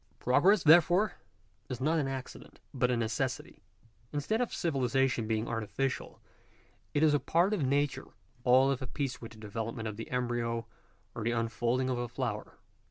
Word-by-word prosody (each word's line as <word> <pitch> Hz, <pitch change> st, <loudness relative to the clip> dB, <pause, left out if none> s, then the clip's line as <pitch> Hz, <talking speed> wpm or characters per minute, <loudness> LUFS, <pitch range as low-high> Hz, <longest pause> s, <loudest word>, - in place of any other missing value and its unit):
Progress, 170 Hz, -, +4 dB
therefore, 175 Hz, +6 st, +5 dB, 0.6 s
is 125 Hz, -3 st, -4 dB
not 155 Hz, +5 st, +2 dB
an 140 Hz, -, 0 dB
accident, 135 Hz, -1 st, -7 dB
but 125 Hz, -2 st, +1 dB
a 125 Hz, -, +1 dB
necessity. 120 Hz, +3 st, -2 dB, 0.5 s
Instead 155 Hz, -, -1 dB
of 245 Hz, -, -1 dB
civilization 135 Hz, -6 st, 0 dB
being 110 Hz, +1 st, -1 dB
artificial, 115 Hz, +4 st, -3 dB, 0.8 s
it 145 Hz, -, +3 dB
is 155 Hz, -2 st, +5 dB
a 145 Hz, -, +3 dB
part 170 Hz, +9 st, +2 dB
of 205 Hz, -, 0 dB
nature; 140 Hz, +1 st, 0 dB, 0.4 s
all 130 Hz, +2 st, +5 dB
of 135 Hz, -, -2 dB
a 130 Hz, -, -4 dB
piece 135 Hz, 0 st, -3 dB
with 115 Hz, -1 st, -9 dB
the -, -, -15 dB
development 110 Hz, +1 st, -4 dB
of 105 Hz, -1 st, -5 dB
die 115 Hz, -, -6 dB
embryo 120 Hz, -2 st, -1 dB, 0.5 s
or 115 Hz, -, -5 dB
the 115 Hz, -, +1 dB
unfolding 120 Hz, +2 st, 0 dB
of 125 Hz, -2 st, -1 dB
a 120 Hz, -, -2 dB
flower. 115 Hz, -3 st, -4 dB
130 Hz, 165 wpm, -31 LUFS, 115-145 Hz, 0.8 s, therefore